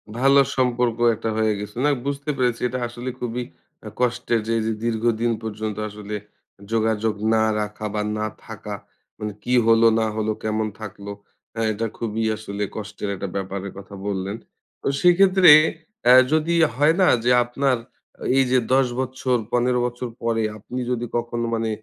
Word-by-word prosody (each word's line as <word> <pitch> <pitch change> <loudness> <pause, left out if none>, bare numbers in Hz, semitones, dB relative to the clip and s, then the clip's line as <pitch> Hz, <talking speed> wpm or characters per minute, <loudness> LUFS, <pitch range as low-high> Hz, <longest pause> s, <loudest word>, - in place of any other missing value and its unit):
ভালো 135 +3 +5 0.2
সম্পর্ক 125 -2 +1 0.2
একটা 115 +1 -3
হয়ে 110 -1 +2
গেছে। 105 0 -7
না - - +4 0.2
বুঝতে 140 +1 -3
পেরেছি 125 -3 0
এটা 130 +1 -4
আসলে 120 +2 -6
খুবই 125 0 -3 0.4
আ - - -5
কষ্টের 120 -1 +1
যে - - -1
এই 110 - 0
যে 110 - 0
দীর্ঘদিন 115 0 +1
পর্যন্ত 110 -1 -4
আসলে 105 0 -7 0.6
যোগাযোগ 110 -1 +1 0.2
না 110 0 +3 0.2
রাখা 105 +1 -5
বা 105 - -1 0.2
না 105 - -1 0.2
থাকা - - -7 0.4
মানে 105 -1 -4
কি 125 - -1
হলো 115 0 +6
না 110 - +1
হলো 110 0 0
কেমন 110 0 0
থাকলো। 100 -1 -7 0.4
হ্যাঁ, 115 -1 -1
এটা 110 +2 -2
খুবই 115 -1 -2
আসলে 105 -1 -5
কষ্টের 105 -1 -5
একটা 100 - -5
ব্যাপারের 95 0 -4
কথা 100 0 -10
বললেন। 100 0 -2 0.5
তো - - -4
সেক্ষেত্রে 185 -1 +6 0.5
অ্যাঁ 125 +1 +8
যদি 160 +2 +2 0.2
হয় 150 +4 +4
না 185 - +5 0.2
যে 125 - +3
আপনার 130 +2 0 0.6
এই 135 - +6
যে 130 - +5
১০ 135 -1 +4
বছর 130 0 -1 0.2
১৫ 125 +1 +2
বছর 125 0 -4
পরে, 115 -1 +1
আপনি 125 +4 -6
যদি 120 -1 -1
কখনো 120 0 -2
মানে 115 0 -1
115 Hz, 165 wpm, -23 LUFS, 110-125 Hz, 0.6 s, অ্যাঁ